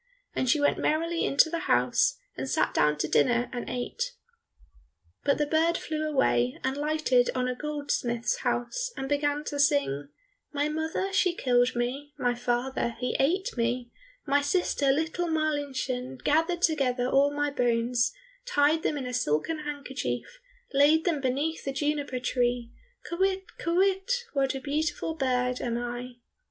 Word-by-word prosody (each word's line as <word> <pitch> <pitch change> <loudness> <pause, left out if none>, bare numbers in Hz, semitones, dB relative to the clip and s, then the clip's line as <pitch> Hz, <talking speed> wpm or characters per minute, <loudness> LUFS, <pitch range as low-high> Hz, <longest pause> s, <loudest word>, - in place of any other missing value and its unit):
And 255 - 0
she 295 - +4
went 290 - +2
merrily 330 +2 0
into 280 - +4
the 335 +1 -2
house, - - +3 0.2
and - - -4
sat - - +1
down 150 0 +3
to 150 - -1
dinner 240 +7 +2
and 245 - -4
ate. 475 - -3 1.1
But 280 - +2
the 295 - +1
bird 325 +3 +2
flew 310 0 -3
away 125 - +2
and 265 +1 0
lighted 290 -4 +2
on 250 0 0
a 250 - 0
goldsmith's 270 -4 -2
house, 245 - -2
and 270 - -3
began 290 +1 0
to 290 -1 -4
sing, 275 - +2 0.4
"My 290 0 0
mother 320 +5 -2
she 365 -3 +2
killed 245 -3 +2
me, 270 +5 -3
My 245 -3 +1
father 245 0 -1
he 250 0 -2
ate 360 +8 +1
me, 240 0 -1 0.3
My 285 0 +3
sister, 285 -2 +1
little 320 +4 -1
Marlinchen, 280 -5 -2
Gathered 330 +4 +1
together 255 -6 +2
all 275 +2 +4
my 290 0 -1
bones, 240 -1 +1 0.4
Tied 300 -5 +3
them 300 - -1
in 265 - -4
a 250 - -5
silken 250 - 0
handkerchief, 260 - -4 0.3
Laid 295 +3 +5
them 325 -6 +1
beneath 280 +5 -1
the 275 - -2
juniper 290 -2 -1
tree, 245 -1 0 0.4
Kywitt, 380 +2 0
kywitt, 380 +4 +1 0.2
what 275 -2 +1
a - - -3
beautiful 295 +3 -1
bird 250 -4 0
am 235 -1 -1
I!" 245 +1 -5
280 Hz, 155 wpm, -28 LUFS, 245-310 Hz, 1.1 s, Laid